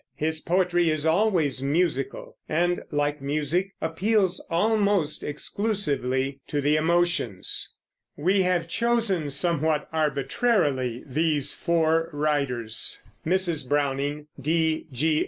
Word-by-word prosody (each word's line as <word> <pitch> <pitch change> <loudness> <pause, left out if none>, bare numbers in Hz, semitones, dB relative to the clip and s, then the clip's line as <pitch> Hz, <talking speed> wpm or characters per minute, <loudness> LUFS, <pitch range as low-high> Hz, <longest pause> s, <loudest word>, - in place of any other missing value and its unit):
His 155 +2 -1
poetry 175 -1 +2
is 155 -1 +1
always 160 -6 +2
musical, 145 -1 -1
and, 175 +3 +1
like 145 -1 -1
music, 155 +7 -1
appeals 185 +3 0
almost 200 -4 +1
exclusively 145 - -1
to 145 - -1
the 145 +2 +2
emotions. 170 - 0 0.5
We 190 +6 +2
have 180 -2 +1
chosen, 225 -6 +1
somewhat 155 0 +1
arbitrarily, 140 - 0
these 150 0 +1
four 165 -1 +1
writers 140 -7 -1 0.3
Mrs. 175 -6 0
Browning, 145 +1 0 0.2
D. 160 +2 0
G. 155 +4 +1
155 Hz, 100 wpm, -25 LUFS, 145-175 Hz, 0.5 s, poetry